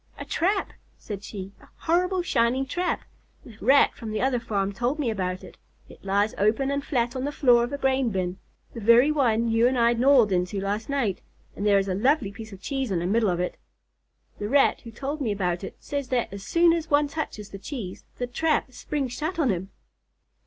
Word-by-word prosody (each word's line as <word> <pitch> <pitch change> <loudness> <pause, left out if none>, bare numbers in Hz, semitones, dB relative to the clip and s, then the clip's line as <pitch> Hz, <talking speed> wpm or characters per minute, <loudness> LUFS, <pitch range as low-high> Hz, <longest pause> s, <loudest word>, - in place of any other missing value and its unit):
"A - - -7
trap!" 390 +4 0 0.2
said 205 -2 -7
she. 195 -2 -7
"A - - -17 0.2
horrible, 360 +2 +2
shining 250 -3 +1
trap. 355 +6 -2 0.4
The 230 - -12
Rat 270 +5 +5
from 225 - -8
the 215 0 -2
other 255 0 +1
farm 200 -4 -2
told 245 +7 -1
me 270 -7 0
about 185 -3 -3
it. - - -13 0.3
It - - -15
lies 200 +2 +1
open 220 +7 +2
and 280 0 -1
flat 245 -3 -1
on 255 - -2
the 290 - -1
floor 245 -5 +4
of 240 - -3
a 285 - -2
grain 265 -2 +1
bin, 185 -2 -2 0.3
the 235 - -6
very 235 +6 +5
one 235 -6 +2
you 225 +1 +4
and 255 0 0
I 235 0 +4
gnawed 245 -3 +4
into 180 +2 0
last 205 +4 -3
night, 245 -10 -1 0.3
and 205 - -2
there 200 -1 +5
is 195 0 +1
a 190 - 0
lovely 225 +1 +2
piece 220 +2 -10
of 195 -1 -12
cheese 270 -3 -2
in 190 - 0
the 170 - -2
middle 215 +3 +2
of 175 -1 -1
it. 180 - -2 0.8
The 205 - -3
Rat 280 +2 +3
who 230 - -10
told 280 +6 -5
me 230 -6 0
about 180 -3 -1
it - - -7
says 285 -2 -4
that 245 -5 -1
as 200 - -7
soon 335 +10 +4
as 330 -2 -2
one 290 0 +3
touches 280 -9 -5
the 195 - -8
cheese, 205 -6 -6
the 250 - -2
trap 280 +1 0
springs 270 -2 -3
shut 315 +7 -3
on 285 -8 +2
him." 190 +1 -3
235 Hz, 220 wpm, -25 LUFS, 200-280 Hz, 0.8 s, Rat